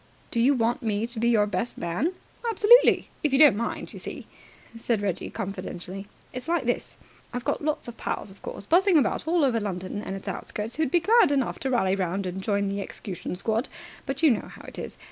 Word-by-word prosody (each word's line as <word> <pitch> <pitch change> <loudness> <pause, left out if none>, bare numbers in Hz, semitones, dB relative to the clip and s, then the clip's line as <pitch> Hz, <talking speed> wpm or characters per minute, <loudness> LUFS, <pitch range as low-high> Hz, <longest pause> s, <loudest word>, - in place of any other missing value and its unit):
"Do 235 - 0
you 265 +5 +4
want 235 0 +1
me 215 -1 0
to 235 -1 -6
be 235 +1 +2
your 215 -3 +4
best 205 +3 -2
man?" 180 - -1 0.4
"Absolutely, 455 +2 +6
if 300 - +1
you 270 - +4
don't 290 -6 +8
mind. 230 +3 -3
You - - -8
see," - - -7 0.5
said 230 -1 0
Reggie 195 -3 -2
confidentially, 190 0 -6 0.3
"it's 255 +3 -6
like 335 -5 +1
this. 245 - -2 0.3
I've 245 -1 -5
got - - -1
lots 300 -3 -1
of 235 -1 -8
pals, - - -3
of 195 - -18
course, - - -6
buzzing 365 - +4
about 270 +2 +1
all 330 -2 +3
over 240 -4 +2
London 195 -1 -4
and 195 - -5
its 195 - -9
outskirts, 215 +5 -4
who'd 315 -3 +1
be 345 +5 +3
glad 430 -3 +5
enough 270 -4 0
to 265 - -2
rally 195 -7 +2
round 190 +1 -1
and 185 +1 -4
join 200 0 0
the 200 0 -2
execution 185 -2 -6
squad; 220 +6 -1 0.4
but 270 +3 -3
you 310 - +7
know 220 - -1
how - - -12
it - - -8
is. - - -7
230 Hz, 220 wpm, -26 LUFS, 195-280 Hz, 0.5 s, don't